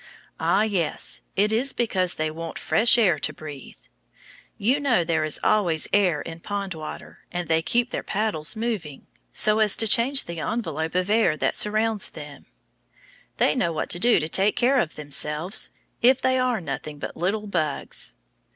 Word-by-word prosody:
Ah, 205 - +3
yes; 190 -8 -2
it 210 +2 +2
is 255 +5 0
because 185 -6 0
they 155 0 -1
want 165 +1 -6
fresh 230 +2 +4
air 185 -10 +3
to 155 - -1
breathe. 150 - -10 0.8
You 250 +8 +2
know 250 -11 +2
there 160 -2 0
is 155 -1 +1
always 175 -7 +2
air 185 -7 +3
in 165 0 -8
pond 200 +1 -4
water, 155 -1 -9
and 175 -1 -3
they 160 0 +2
keep 240 +8 0
their - - -2
paddles 200 -7 -2
moving, 215 - -4 0.3
so 215 0 +2
as 215 -2 +3
to 225 - +1
change 255 +6 +3
the 170 -1 -7
envelope 160 -6 -3
of 185 +2 +1
air 215 -8 +3
that - - 0
surrounds 215 0 0
them. 145 -2 -10 0.9
They - - +3
know 170 - 0
what 160 - -3
to 175 - +3
do 235 +5 +5
to 155 - -2
take 195 +5 +2
care 255 +2 +3
of 165 - -1
themselves, 150 +5 -1 0.3
if 255 +2 +5
they 260 0 +2
are 250 -3 +1
nothing 150 -2 -6
but 145 - -6
little 200 +6 -1
bugs. 155 -8 -2
190 Hz, 175 wpm, -24 LUFS, 160-220 Hz, 0.9 s, do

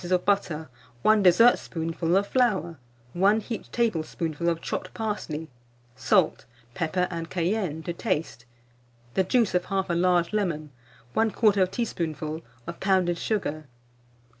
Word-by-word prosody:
of 180 0 0
butter, 175 -6 0 0.4
1 215 -1 +5
dessertspoonful 175 -4 +3
of 200 - +2
flour, 200 - +1 0.3
1 200 +5 +3
heaped 225 +1 -6
tablespoonful 170 -6 -1
of 165 -1 -1
chopped - - -4
parsley; 185 -8 -3 0.5
salt, 180 +6 +2 0.3
pepper, 180 +5 0
and 165 -1 -5
cayenne 175 -3 -1
to 175 - -3
taste; 165 - -3 0.7
the 190 - +2
juice 230 +2 +2
of 180 0 +1
1/2 190 -3 -1
large 180 0 +2
lemon, 165 -8 -1 0.4
1/4 210 -4 +3
teaspoonful 160 -7 -3 0.2
of 170 - -7
pounded 185 -3 +2
sugar. 155 -9 -2
180 Hz, 120 wpm, -26 LUFS, 165-205 Hz, 0.7 s, 1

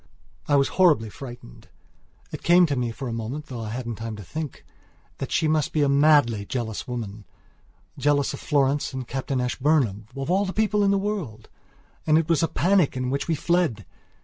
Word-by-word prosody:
I 145 - +3
was 140 -1 +3
horribly 145 - +4
frightened. 120 - -11 0.6
It - - -6
came 175 +1 +5
to 145 -4 -1
me 125 -2 -1
for 130 +3 -6
a 115 - -3
moment, 115 +7 -5
though 125 -5 -7
I 110 - -5
hadn't 115 -1 -5
time 115 -1 -5
to 105 - -9
think 155 - -6
it, - - -34
that - - -4
she 160 - +2
must 155 -1 +1
be 150 - +2
a - - +3
madly 140 -7 +4
jealous 110 0 -4
womanjealous 115 +3 -4
of - - -6
Florence 140 0 +1
and 130 -2 -5
Captain 135 0 -2
Ashburnham, 125 -5 0
of 135 +5 -2
all 195 +2 +2
people 210 -1 +1
in 200 - +3
the 200 - +3
world! 185 - -4 0.6
And 155 0 +5
it 160 -1 +1
was 165 -4 +3
a 165 - +2
panic 180 -7 +2
in 125 0 -2
which 140 +1 -2
we 165 - +1
fled! 160 - 0
135 Hz, 195 wpm, -24 LUFS, 115-155 Hz, 0.6 s, came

